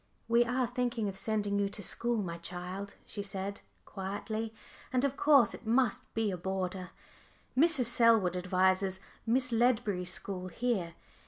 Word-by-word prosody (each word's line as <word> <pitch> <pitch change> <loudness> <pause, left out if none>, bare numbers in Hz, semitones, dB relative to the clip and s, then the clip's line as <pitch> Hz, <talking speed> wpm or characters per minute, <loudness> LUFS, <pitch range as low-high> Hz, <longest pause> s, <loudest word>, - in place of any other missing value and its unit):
"We 235 +1 +5
are 250 +2 +1
thinking 245 -2 -1
of 195 - -4
sending 205 0 0
you 200 -1 +1
to 205 - -6
school, 235 +2 +1
my 170 -2 -5
child," 180 +3 -5
she 205 - -5
said 200 0 -4 0.2
quietly, 210 +3 -4 0.4
"and 255 +1 +2
of 280 -1 -1
course 280 -8 +5
it - - -10
must 235 -1 +1
be 220 -2 +1
as 180 - -4
a - - -19
boarder. 185 0 -3 0.7
Mrs. 300 -2 +4
Selwood 230 -6 +4
advises 185 +1 +2 0.3
Miss 255 +2 +2
Ledbury's 225 -6 +2
school 185 -1 -2
here. 185 -4 -1
205 Hz, 155 wpm, -32 LUFS, 190-240 Hz, 0.7 s, We